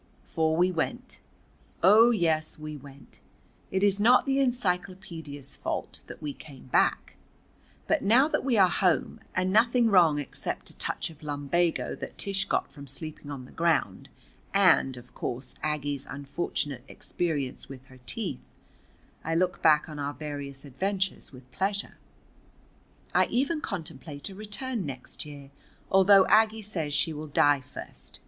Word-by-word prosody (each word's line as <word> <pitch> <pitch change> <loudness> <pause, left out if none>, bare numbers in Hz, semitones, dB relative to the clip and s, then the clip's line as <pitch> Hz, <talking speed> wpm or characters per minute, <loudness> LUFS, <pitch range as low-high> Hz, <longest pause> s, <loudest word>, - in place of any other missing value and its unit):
For 160 0 0
we 180 +2 +4
went. 160 -3 -3 0.6
Oh, 215 +6 +8
yes, 160 -8 +1
we 155 0 -7
went. 140 -1 -13 0.5
It 190 +1 0
is 200 -1 +3
not 240 +4 +5
the 270 -1 +1
encyclopædia's 180 - -2
fault - - -4
that - - -10
we 145 -1 -3
came 140 -2 -13
back. 130 - +1 0.7
But - - +1
now 240 +8 +5
that - - -1
we 255 -4 +2
are 190 -2 +7
home, 180 -1 +1 0.2
and 185 0 +1
nothing 230 +1 +4
wrong 170 -6 +6
except 145 -3 -5
a - - -24
touch - - -3
of 155 0 -17
lumbago 150 +3 0
that - - -8
Tish 200 0 0
got - - -1
from 140 -3 -11
sleeping 145 +2 -7
on 135 -3 -6
the - - -15
ground, 170 0 0 0.5
and, 180 -9 +4
of 125 0 -13
course, 125 +1 -4
Aggie's 145 -2 -2
unfortunate 140 -2 -3
experience 145 -7 -3
with 135 -1 -10
her 130 -1 -17
teeth, 65 - -2 0.8
I 165 +1 -1
look 180 +2 +1
back 155 -1 +5
on 150 -2 -8
our 145 0 -3
various 145 -2 -6
adventures 190 +7 -2
with 130 -1 -15
pleasure. 200 +7 -2 1.1
I - - +4
even 285 +5 0
contemplate 160 - -6
a - - -9
return 215 +3 -3
next 135 0 -7
year, 140 -2 -11 0.4
although 195 0 +7
Aggie 220 0 +4
says 170 -8 -3
she 160 - +2
will 155 +1 -6
die 145 -1 +3
first. - - -10
160 Hz, 150 wpm, -28 LUFS, 145-195 Hz, 1.1 s, Oh